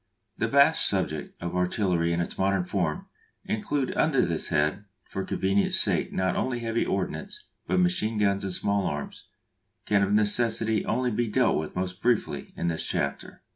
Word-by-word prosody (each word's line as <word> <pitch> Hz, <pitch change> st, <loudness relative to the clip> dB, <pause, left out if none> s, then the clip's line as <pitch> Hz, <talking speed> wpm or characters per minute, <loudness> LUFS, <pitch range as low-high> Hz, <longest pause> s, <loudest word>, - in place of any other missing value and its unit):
The -, -, -1 dB
vast -, -, +4 dB
subject -, -, -3 dB
of 85 Hz, +1 st, -4 dB
artillery 90 Hz, -2 st, +1 dB
in 85 Hz, +1 st, 0 dB
its 85 Hz, -, -4 dB
modern 95 Hz, -1 st, +1 dB
form, 90 Hz, -4 st, -2 dB, 0.4 s
including 130 Hz, +5 st, -2 dB
under 140 Hz, -5 st, +2 dB
this 85 Hz, -2 st, -2 dB
head 75 Hz, +8 st, 0 dB, 0.2 s
for 95 Hz, -, -5 dB
convenience' 95 Hz, +2 st, +2 dB
sake -, -, +2 dB
not 95 Hz, -1 st, 0 dB
only 130 Hz, -2 st, -1 dB
heavy 115 Hz, 0 st, 0 dB
ordnance 420 Hz, -, -4 dB, 0.2 s
but -, -, +1 dB
machine 145 Hz, -12 st, +1 dB
guns 100 Hz, -1 st, +1 dB
and 95 Hz, -, -3 dB
small 100 Hz, +1 st, 0 dB
arms, 75 Hz, -1 st, -5 dB, 0.6 s
can 100 Hz, -1 st, +2 dB
of 100 Hz, 0 st, +1 dB
necessity 110 Hz, +1 st, +2 dB
only 125 Hz, +2 st, 0 dB
be 115 Hz, +1 st, -1 dB
dealt -, -, +2 dB
with 80 Hz, -, -6 dB
most 90 Hz, +1 st, -3 dB
briefly 120 Hz, -2 st, 0 dB
in 85 Hz, -, -2 dB
this 80 Hz, -1 st, -1 dB
chapter. 70 Hz, 0 st, -3 dB
100 Hz, 170 wpm, -26 LUFS, 90-115 Hz, 0.6 s, vast